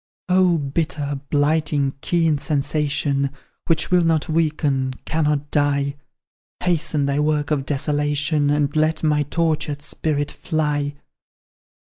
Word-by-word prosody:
"Oh, 180 -2 +4
bitter, 145 -1 -2
blighting, 145 -1 +1
keen 165 -4 +1
sensation, 140 -1 0 0.4
Which 160 0 +1
will 180 -1 +5
not 160 -2 +1
weaken, 150 -5 0
cannot 150 -2 0
die, 140 -1 +1 0.7
Hasten 165 -4 +1
thy 140 +1 0
work 150 0 0
of 140 -3 0
desolation, 145 +1 +1
And 145 0 +1
let 155 +1 +1
my 150 -1 +3
tortured 150 -1 -1
spirit 145 -1 -2
fly! 145 -2 -1
150 Hz, 110 wpm, -21 LUFS, 145-155 Hz, 0.7 s, will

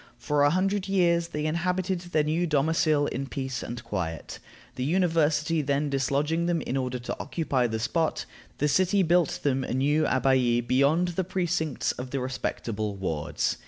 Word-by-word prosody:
For 150 -1 0
a 145 - +5
hundred 195 +4 0
years 170 -3 +2
they 150 -2 -4
inhabited 180 +3 0
their 175 -3 0
new 160 +4 0
domicil 155 0 +2
in 135 +2 -3
peace 130 -2 -4
and 120 0 -6
quiet. 80 -5 -4 0.3
The 125 - -4
University 160 -1 +2
then 145 0 0
dislodging 145 +5 0
them 175 -1 +1
in 130 - -3
order 130 -1 -1
to 120 - -5
occupy 135 -7 0
the 110 -1 -2
spot, 160 +8 -1 0.3
the 150 - +1
city 185 +5 +3
built 175 -2 +2
them 135 -2 +1
a 125 - -3
new 145 +4 +2
abbaye 125 -3 +2
beyond 140 +8 +3
the 175 +2 -1
precincts 175 -5 -1
of 125 +1 -7
the 135 - -2
respectable 110 -4 -3
wards. 80 -6 -2
150 Hz, 165 wpm, -27 LUFS, 130-170 Hz, 0.3 s, a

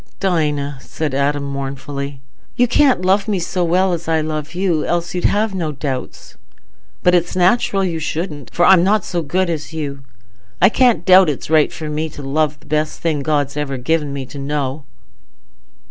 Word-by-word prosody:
"Dinah," 150 -7 0
said 155 -1 -4
Adam 140 +1 0
mournfully, 140 0 -5 0.3
"you 245 - +3
can't 255 -6 +3
love 195 +3 +2
me 205 -2 0
so 180 +1 -1
well 180 +2 +2
as 170 -1 -4
I 160 -1 +2
love 155 0 -4
you, 180 -4 +1
else 175 0 -1
you'd 180 - -2
have 210 0 +1
no 170 -5 -2
doubts. 135 -3 -6 0.7
But 180 - +4
it's 175 0 +1
natural 195 +2 +2
you 170 -3 -1
shouldn't, 155 -2 -4
for 175 - +2
I'm 185 -3 +6
not 205 +1 +2
so 175 - -2
good 180 +5 0
as 160 -2 -4
you. 140 -3 -4 0.6
I 190 - +6
can't 235 - +2
doubt 185 -2 +7
it's 150 +1 -4
right 155 -2 +4
for 155 - -6
me 155 +1 -2
to 145 - -10
love 150 +2 0
the - - -22
best 155 0 -1
thing 155 -4 -1
God's 145 -2 0
ever 145 -2 -3
given 150 +3 0
me 140 -1 -4
to 140 +2 -9
know." 140 0 -3
155 Hz, 185 wpm, -18 LUFS, 145-180 Hz, 0.7 s, doubt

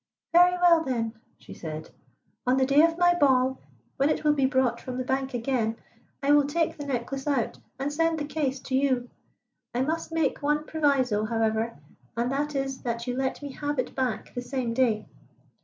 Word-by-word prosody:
"Very 355 +1 +7
well, 345 -2 +5
then," 230 -5 -2 0.2
she - - -12
said. 155 -1 -7 0.6
"On 255 +1 +4
the 265 - +3
day 275 +3 +5
of 330 0 +3
my 350 0 +5
ball, 265 -5 +3 0.4
when 275 +2 +3
it - - 0
will 300 -1 +4
be 275 -2 +2
brought 260 -3 +1
from 255 -1 -5
the 255 - -1
bank 265 0 -1
again, 230 -2 0 0.5
I 280 - +3
will 290 -1 +5
take 325 +2 0
the 290 -1 -7
necklace 270 +2 -3
out 275 -6 0 0.2
and 275 +2 -2
send 330 +1 +1
the 295 - -2
case 280 -3 -2
to 260 - -3
you. 260 -3 +1 0.6
I 250 - +2
must 325 +3 -2
make 320 -4 0
one 295 +1 +1
proviso, 265 -9 +1
however, 225 0 0 0.4
and 240 +2 0
that 290 +2 -1
is 270 -1 -2
that 235 -1 -3
you 250 -1 -2
let 265 +2 -2
me 285 - -5
have 290 +1 -3
it 255 - -2
back 250 -5 -2
the 245 - -3
same 245 -2 -2
day." 230 -4 +1
270 Hz, 195 wpm, -27 LUFS, 245-295 Hz, 0.6 s, Very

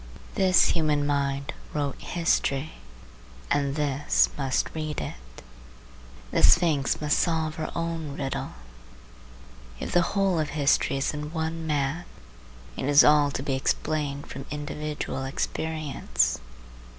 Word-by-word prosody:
This 185 -2 +4
human 150 -3 +1
mind 140 -1 -1 0.2
wrote 145 -2 -2
history, 155 -4 0 0.8
and 140 -1 +1
this 145 -2 +2
must 135 -2 -1
read 155 -1 -3
it. - - -8 0.9
The - - +1
Sphinx 160 -6 +4
must 150 -1 +1
solve 160 -2 0
her 155 - -3
own 165 -4 -3
riddle. 135 -1 -3 1.3
If - - -4
the 175 - +4 0.2
whole 195 -4 +2
of 155 -2 -1
history 140 -1 +2
is 135 - 0
in 150 0 -5
one 160 0 -3
man, 150 +3 -1 0.7
it - - -3
is 145 +1 +7
all 150 -1 +5
to 135 - -4
be 140 - -1
explained 140 +1 -1
from 135 +1 -8
individual 150 -2 -4
experience. 135 - -1
150 Hz, 125 wpm, -26 LUFS, 140-160 Hz, 1.3 s, is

